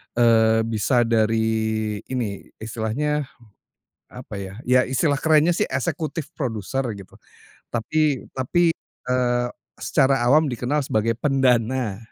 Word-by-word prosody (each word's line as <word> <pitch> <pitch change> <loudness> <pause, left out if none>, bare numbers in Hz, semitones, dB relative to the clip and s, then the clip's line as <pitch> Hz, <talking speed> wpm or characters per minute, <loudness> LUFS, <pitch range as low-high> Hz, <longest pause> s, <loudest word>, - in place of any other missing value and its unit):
eee, 110 -1 +4
bisa 115 +2 +1
dari 110 -1 0
ini, 115 -7 -4 0.2
istilahnya 130 +7 -2 0.8
apa 115 -5 -8
ya, 95 +1 -7
ya 125 +1 +4
istilah 140 +2 +1
kerennya 160 +2 +4
sih - - 0
executive 150 +4 -3
producer, 125 - -3
gitu. 100 -2 -13 0.6
Tapi 140 +4 0
tapi, 170 +7 +2 0.4
eee, 125 -1 +1 0.3
secara 135 -2 +2
awam 150 +5 +5
dikenal 130 +4 -1
sebagai 115 0 0
pendana, 125 -5 +1
120 Hz, 110 wpm, -23 LUFS, 110-140 Hz, 0.8 s, awam